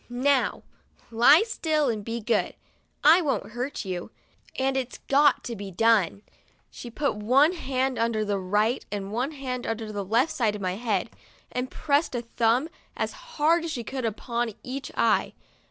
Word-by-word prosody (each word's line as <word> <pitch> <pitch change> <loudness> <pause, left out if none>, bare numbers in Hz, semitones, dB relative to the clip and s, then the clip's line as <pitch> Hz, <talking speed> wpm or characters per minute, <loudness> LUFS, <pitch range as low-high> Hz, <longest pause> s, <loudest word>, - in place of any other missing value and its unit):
'Now, 260 +3 +1 0.5
lie 245 - +6
still 315 -9 0
and 220 -4 -1
be 230 +2 -4
good! 225 +2 0 0.5
I 320 +5 +7
won't 285 -8 -2
hurt 245 +1 -4
you, 180 0 -4 0.5
and 265 0 +1
it's 260 -2 -3
got 285 +1 +4
to 235 - -5
be 200 -1 -7
done." 205 -1 +2 0.5
She 240 - -9
put 280 +4 -1
one 260 +10 +4
hand 265 -6 -1
under 225 -2 0
the 205 -1 -1
right 210 +6 +1
and 200 -1 -4
one 250 +5 0
hand 255 -3 -5
under 225 -1 -3
the 205 -1 -3
left 230 - +2
side 225 -7 0
of - - -6
my 180 -1 0
head, 215 -3 -1 0.4
and 250 +1 -3
pressed 285 -1 0
a 240 - -2
thumb, 230 +4 +1 0.3
as - - -1 0.3
hard 325 +3 +3
as 335 - -3
she 245 -6 -4
could, 260 +3 -5
upon 235 0 -2
each 265 +1 -6
eye. - - +2
240 Hz, 170 wpm, -26 LUFS, 215-275 Hz, 0.5 s, I